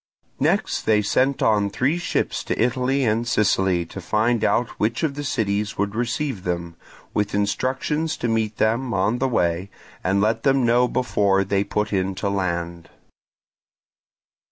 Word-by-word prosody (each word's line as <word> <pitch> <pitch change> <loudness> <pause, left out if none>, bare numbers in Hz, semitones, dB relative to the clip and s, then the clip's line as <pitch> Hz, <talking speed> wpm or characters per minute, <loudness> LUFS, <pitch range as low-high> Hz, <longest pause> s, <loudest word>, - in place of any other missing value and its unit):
Next - - 0
they 105 -1 +4
sent 130 +6 +1
on 105 -2 +3
three 135 - 0
ships - - -1
to - - -2
Italy 130 +3 +1
and 115 +1 0
Sicily 95 -6 +2
to 95 +3 -9
find 110 +5 +1
out 120 0 +2
which 110 +9 0
of 155 -3 +1
the 145 +1 -5
cities 105 -6 -1
would 100 0 -1
receive 120 -1 -2
them, 85 -1 -3 0.4
with 105 -1 -1
instructions 130 +9 -1
to 120 - -2
meet 110 -1 -1
them 115 +2 +1
on 105 +6 +1
the 135 - +1
way 90 -4 0 0.3
and 95 +2 +1
let 110 +2 +1
them 135 -1 +3
know 120 +1 +4
before 100 -6 +1
they 100 0 0
put 105 +1 -2
in 95 0 0
to 100 - -2
land. 85 -3 -3
105 Hz, 155 wpm, -23 LUFS, 100-125 Hz, 0.4 s, they